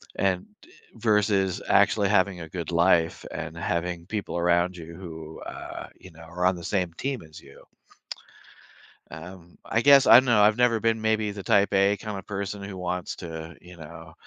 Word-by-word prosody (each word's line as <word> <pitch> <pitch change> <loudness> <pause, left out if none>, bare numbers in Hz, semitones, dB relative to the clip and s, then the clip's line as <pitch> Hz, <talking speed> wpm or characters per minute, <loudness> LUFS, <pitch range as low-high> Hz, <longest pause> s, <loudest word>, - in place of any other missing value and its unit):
And, 95 -2 0 0.2
eh - - -22 0.3
versus 105 -4 +1
actually 100 -2 +3
having 95 -2 +2
a 80 - -8
good 85 -1 -5
life 85 -1 +2
and 85 - -6
having 85 0 -3
people 105 -3 -4
around 85 +1 +1
you 85 0 -10
who, 80 -4 -9
uh, - - -8
you 95 - -13
know, 80 +1 -16
are 90 +2 -4
on 95 0 +3
the 85 - -9
same 90 -3 -1
team 135 +5 -4
as 80 -2 -14
you? - - -17 1.5
Um, 85 +2 -11
I 115 - 0
guess, 140 0 +6
I - - +8
don't 130 - +7
know, 115 -4 +4
I've 105 +2 +4
never 120 -2 +3
been 115 0 0
maybe 110 -1 0
the 100 -2 -8
type 100 0 +2
A 100 +1 +3
kinda 100 -2 -6
person 100 0 -5
who 100 -1 -7
wants 90 0 -4
to, 80 -1 -8
you 90 +1 -14
know, 80 +1 -11
95 Hz, 185 wpm, -25 LUFS, 85-105 Hz, 1.5 s, I